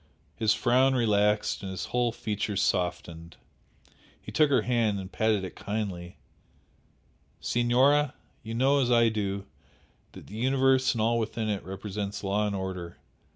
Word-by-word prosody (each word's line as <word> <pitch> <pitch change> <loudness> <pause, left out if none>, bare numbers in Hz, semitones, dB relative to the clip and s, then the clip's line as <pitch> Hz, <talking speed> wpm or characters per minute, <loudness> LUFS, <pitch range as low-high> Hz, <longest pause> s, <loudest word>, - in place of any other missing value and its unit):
His 110 -1 +2
frown 130 +2 +3
relaxed 105 -2 +1
and 95 - -5
his 95 -2 -4
whole 120 -1 +2
features 105 -3 -3
softened. 90 -4 -2 0.8
He - - -10
took 155 -2 +3
her 130 -6 +3
hand 115 -4 +1
and 95 0 -8
patted 110 -3 +1
it 95 - -7
kindly. 100 -4 -5 1.2
"Signora, 130 +4 +2 0.3
you 115 0 -6
know 135 +3 +3
as 125 - +1
well 120 - +5
as - - +5
I - - +4
do, 100 -2 -3 0.7
that - - -12
the 105 - -9
universe 130 +1 +3
and 110 - -1
all 115 +1 +2
within 110 0 -2
it 100 -2 -1
represents 100 +2 -5
law 100 +2 0
and 100 - -2
order. 90 -3 -5
110 Hz, 155 wpm, -28 LUFS, 100-120 Hz, 1.2 s, well